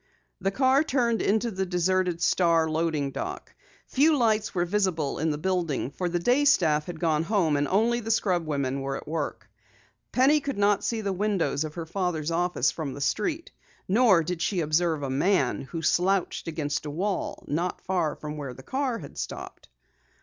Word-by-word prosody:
The 195 0 0
car 260 +7 +3
turned 240 -6 +1
into 220 +3 +1
the 190 -1 -2
deserted 180 -1 0
Star 165 -3 +3
loading 155 -3 -1
dock. 365 - -6 0.3
Few 300 +3 +3
lights 220 -4 +1
were 175 -1 +1
visible 180 -6 0
in 160 - +1
the 150 - -1
building, 165 -6 -1
for 180 +3 -2
the 175 - 0
day 245 +11 +2
staff 155 - +3
had 175 -3 -6
gone 155 -2 +1
home 165 -4 +1
and 145 0 +1
only 230 +5 +2
the 225 -1 -6
scrub 180 -7 +1
women 140 -2 -1
were 135 0 -3
at - - -10
work. 155 -1 -4 0.6
Penny 275 +4 +4
could 280 -4 -4
not 205 0 +2
see 230 -2 -1
the 200 -2 -1
windows 180 -8 0
of 155 -1 -6
her 170 -2 -4
father's 170 -3 -2
office 170 -4 +1
from 150 -5 -5
the - - -7
street. 325 - -1 0.4
Nor 200 -4 +4
did 175 +1 -4
she 180 0 0
observe 155 0 +1
a 135 - -2
man 140 -1 +1
who 160 +5 -6
slouched 185 +1 +1
against 150 -2 -2
a - - -3
wall, 185 +6 -3
not 170 +5 -2
far 175 -5 -1
from 150 0 -7
where 135 -4 -6
the 130 - -12
car 260 - -1
had - - -10
stopped. - - -7
175 Hz, 185 wpm, -26 LUFS, 155-210 Hz, 0.6 s, Penny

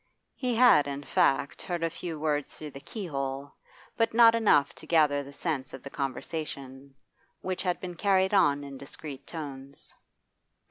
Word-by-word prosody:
He 250 -3 -1
had, 230 - +6
in 140 0 -4
fact, 140 0 +1
heard 175 -2 -3
a 165 - +2
few 165 -1 -5
words 150 -2 -1
through 150 -1 -8
the 135 - -9
keyhole, 140 - -4 0.4
but 230 -1 +1
not 230 -1 +8
enough 210 -11 +4
to - - -13
gather 150 -4 +4
the 140 0 -10
sense 140 -3 -3
of 135 - -12
the 140 - -8
conversation, 135 -1 -5 0.5
which 185 -1 -2
had 180 -2 0
been 180 -1 -6
carried 190 +2 +2
on 145 -7 +4
in 140 -1 -8
discreet 140 0 -9
tones. 140 -4 -6
150 Hz, 165 wpm, -29 LUFS, 140-180 Hz, 0.5 s, not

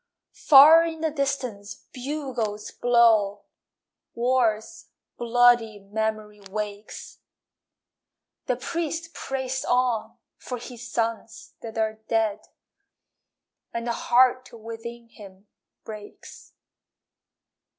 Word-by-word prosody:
Far 305 +4 +9
in 325 -1 -4
the 320 -1 0
distance 260 -8 -3 0.2
bugles 250 -6 -4
blow, 225 -4 +3 0.7
War's 235 -3 0 0.3
bloody 240 -2 +3
memory 210 +1 -4
wakes. 210 0 -6 1.3
The 250 - +1
priest 330 +4 -4
prays 265 -1 -3
on 245 -3 0 0.2
for 250 - -6
his 245 0 -10
sons 225 -2 -3
that 225 -1 -8
are 220 0 -1
dead, 220 -2 0 1.3
And 235 0 -3
the 235 - -1
heart 255 +2 +2
within 230 +1 -9
him 195 -3 -14 0.4
breaks. 210 -2 -11
235 Hz, 90 wpm, -25 LUFS, 215-255 Hz, 1.3 s, Far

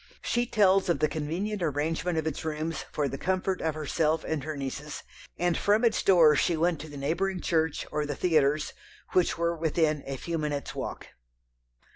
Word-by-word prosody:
She 240 0 0
tells 195 -4 +3
of 170 - +3
the 155 - +2
convenient 170 +8 -3
arrangement 160 +2 -1
of 160 - 0
its 160 -3 -3
rooms 155 +1 -3
for 145 -2 0
the 135 0 -5
comfort 185 +1 -1
of 160 -1 -1
herself 155 +1 0
and 155 -3 -2
her 155 0 -4
nieces, 140 +2 -5 0.3
and 175 -1 +1
from 210 +4 +3
its 230 - +2
door 165 -6 +6
she 170 +2 +2
went 165 -1 +1
to 155 - -9
the 145 - -9
neighbouring 180 +7 -1
church, 160 -3 0
or 150 0 -1
the 145 - -3
theatres, 155 -3 +2 0.4
which 180 -2 +2
were 170 0 0
within 155 -2 +1
a 135 -1 -3
few 165 +4 -3
minutes' 145 -2 -3
walk. - - -6
160 Hz, 185 wpm, -28 LUFS, 150-175 Hz, 0.4 s, door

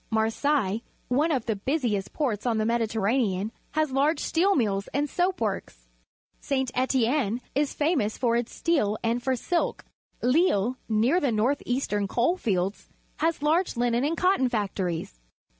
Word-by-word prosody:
Marseilles, 225 0 +1 0.3
one 295 +6 +2
of 260 -6 0
the 220 - 0
busiest 220 -3 -1
ports 250 -7 -2
on 230 -2 +1
the 215 - +1
Mediterranean, 220 -2 0 0.2
has 310 -2 +1
large 285 +5 +2
steel 385 +4 +2
mills 200 -5 0
and 290 +1 +1
soap 360 +4 0
works. 195 - -4 0.5
Si. 265 -1 0
Etienne 255 -2 +1
also 245 +1 -5
is 290 0 0
famous 290 -9 +1
for 235 -2 +1
its 235 0 -1
steel 250 -12 +1
and 235 +1 0
for 260 +1 0
silk. 340 +8 -1 0.4
Lille, 250 - +3
near 230 +10 +3
the 280 -7 +1
north 230 +6 +1
eastern 210 -5 0
coal 245 - +1
fields, 195 - -2 0.3
has 325 -3 0
large 320 -1 +1
linen 240 +1 +1
and 320 +3 0
cotton 365 -9 +3
factories. 190 - -3
245 Hz, 155 wpm, -26 LUFS, 215-295 Hz, 0.5 s, Lille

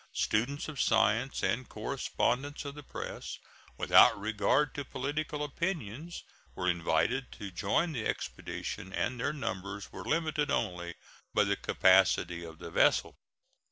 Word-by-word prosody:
Students 125 +7 0
of 150 -4 -3
science 110 +4 +2
and 130 -2 0
correspondents 140 +5 -1
of 140 - -5
the 150 - -9
press, 140 - -6 0.4
without - - +6
regard 110 +7 +1
to 145 - -4
political 145 +3 -3
opinions, 155 - -4 0.3
were 90 - -2
invited 105 +9 +1
to 100 -2 -7
join 105 - +1
the 120 -7 -2
expedition, 95 - -4
and 120 +4 -1
their - - 0
numbers 100 -7 -5
were - - -7
limited 155 -2 0
only 85 -7 -1 0.4
by 105 - +5
the 100 0 +1
capacity 95 -3 +3
of 80 -1 -9
the - - -8
vessel. - - +3
120 Hz, 135 wpm, -31 LUFS, 95-145 Hz, 0.4 s, without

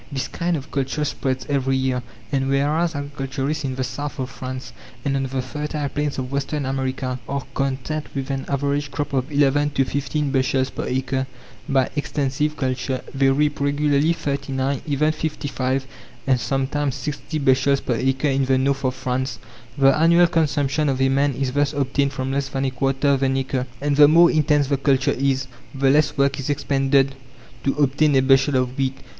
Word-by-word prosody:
This 135 -2 -2
kind 170 0 -1
of 140 +1 -9
culture 140 +2 -1
spreads 130 -2 -2
every 135 -2 +1
year, 130 -1 0 0.3
and 135 -1 0
whereas 150 +4 +1
agriculturists 140 +1 -3
in 130 -2 -2
the 130 - -2
south 145 +4 -5
of 130 -1 -4
France 130 -1 -7 0.3
and 140 -1 +1
on 135 - 0
the 130 0 -2
fertile 150 +2 -3
plains 145 0 -2
of 130 -1 -4
western 140 +1 -2
America 130 -1 -2
are 140 -1 -2
content 135 +3 -2
with 135 0 -3
an 135 -1 -3
average 140 +1 0
crop 145 0 -4
of 135 +2 -1
11 145 0 +3
to 135 -2 +1
15 140 +1 -2
bushels 130 0 +1
per - - -4
acre 130 +1 -1 0.4
by 135 -2 +3
extensive 145 +1 -1
culture, 130 -1 -2
they 135 -1 +3
reap 145 +2 +1
regularly 145 +2 +2
39, 140 -4 -2
even 150 +2 +2
55, 135 -4 -2 0.4
and 130 -2 +3
sometimes 135 +1 -1
60 145 +4 -4
bushels 135 0 +3
per 125 - -2
acre 135 +4 +1
in 135 0 +1
the 130 0 +2
north 135 +1 0
of 130 -1 0
France. 130 -2 -2 0.4
The 135 -1 +5
annual 170 +2 +5
consumption 150 -3 +1
of 135 -1 -1
a 135 0 +3
man 140 0 +2
is 135 0 -1
thus 145 +2 +1
obtained 140 0 0
from 130 -1 -3
less 140 0 -1
than 135 0 -2
a 130 - 0
quarter 135 +2 0
of 135 -1 +2
an 135 0 +2
acre. 130 -1 -2
And 145 0 0
the 145 0 +8
more 170 +3 +6
intense 150 -2 +3
the 140 - +2
culture 135 -1 +2
is, 135 0 0 0.3
the 135 0 +3
less 150 +1 +2
work 140 0 +2
is 140 - -4
expended 135 -1 +2 0.5
to 135 - +1
obtain 145 +1 +2
a 130 - +5
bushel 135 +1 +4
of 130 0 0
wheat. 135 0 0
135 Hz, 185 wpm, -22 LUFS, 130-145 Hz, 0.5 s, the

